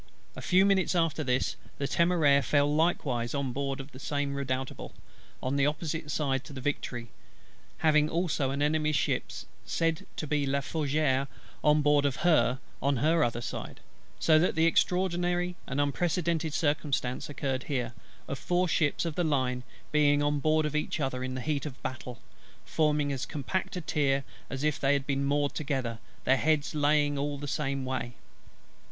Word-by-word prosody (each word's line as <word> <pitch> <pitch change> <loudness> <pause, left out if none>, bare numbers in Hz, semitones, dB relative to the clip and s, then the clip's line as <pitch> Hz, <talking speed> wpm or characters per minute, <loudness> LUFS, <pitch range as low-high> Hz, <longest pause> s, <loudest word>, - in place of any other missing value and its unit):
A - - -7
few 185 +2 +4
minutes 195 -2 +2
after 165 -2 +1
this, 125 -1 0 0.2
the 140 - -1
Temeraire 165 -5 +4
fell 145 +2 +2
likewise 145 -7 0
on 135 -3 -1
board 135 +1 -2
of 135 +2 -8
the 130 - -11
Redoutable, 140 -2 -3 0.5
on 130 +2 0
the 140 - +3
side - - +4
opposite 150 -3 -1
to 140 - -10
the 135 - -6
Victory; 125 -3 -3 0.7
having 155 -1 +3
also 160 -6 0
an 140 +2 -1
Enemy's 155 0 +1
ship, 130 - +1 0.4
said 165 +8 -1
to - - -3
be 145 -1 0
La 140 +1 +1
Fougueux, 140 -2 0 0.4
on 150 0 +4
board 145 -1 +4
of 140 -2 +1
her 155 -7 +4 0.2
on 140 -1 +2
her 160 +5 +3
other 120 -1 -1
side: - - -6 0.4
so 155 -1 +5
that 175 - +2
the 160 +1 +3
extraordinary 175 0 +1
and 135 +1 -2
unprecedented 160 +1 0
circumstance 145 -5 -1
occurred 135 -2 -2
here, 125 -5 -2 0.3
of 135 - -4
four 180 +1 +1
ships 160 -1 +1
of 165 - -2
the 175 - 0
line 130 -5 0 0.3
being 145 -1 +4
on 145 0 +1
board 155 +1 +2
of 150 0 -2
each 150 +1 -1
other 130 -3 -2
in 130 0 -3
the 130 - -3
heat 150 +1 -1
of 135 - -9
battle; 125 -1 -5 0.5
forming 150 -2 +1
as 135 -3 -3
compact 190 +7 -3
a 180 - -3
tier 140 -3 +1 0.3
as 135 +1 -4
if 150 -1 +1
they 135 +1 +3
had 140 -1 0
been 140 -1 0
moored 145 0 +1
together, 130 -6 -2 0.2
their 130 +4 +4
heads 150 +2 +1
lying 145 -1 +2
all 145 0 -2
the 145 +1 -6
same 135 -1 -2
way. 130 -2 -3
145 Hz, 175 wpm, -29 LUFS, 135-155 Hz, 0.7 s, so